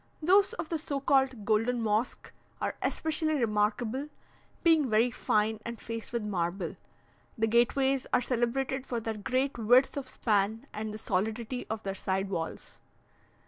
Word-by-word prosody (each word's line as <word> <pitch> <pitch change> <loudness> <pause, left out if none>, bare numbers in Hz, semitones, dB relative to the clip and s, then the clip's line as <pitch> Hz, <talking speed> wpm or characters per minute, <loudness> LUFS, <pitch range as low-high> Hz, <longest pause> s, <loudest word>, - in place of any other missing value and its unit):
Those 390 +6 +4
of 340 -9 -5
the 325 - -1
so 285 -2 -2
called 265 -5 +2
"Golden 225 +3 +2
Mosque" 220 +2 -1 0.3
are - - -1
especially 315 0 0
remarkable, 230 +3 0 0.5
being 320 -6 +4
very 225 +3 +3
fine 215 -2 +1
and 235 -1 -6
faced 230 -1 -6
with 235 -3 -2
marble; 175 -2 -2 0.6
the 225 - +2
gateways 255 +4 +2
are - - +4
celebrated 255 +2 -1
for 240 - -1
their 225 0 -3
great 255 +5 -1
width 245 +4 +4
of 275 -2 -4
span 215 +2 0
and 215 0 -4
the 215 - -6
solidity 220 +5 -2
of 220 0 -3
their 195 - -2
side 195 0 -2
walls. 165 -3 -5
235 Hz, 150 wpm, -30 LUFS, 215-265 Hz, 0.6 s, Those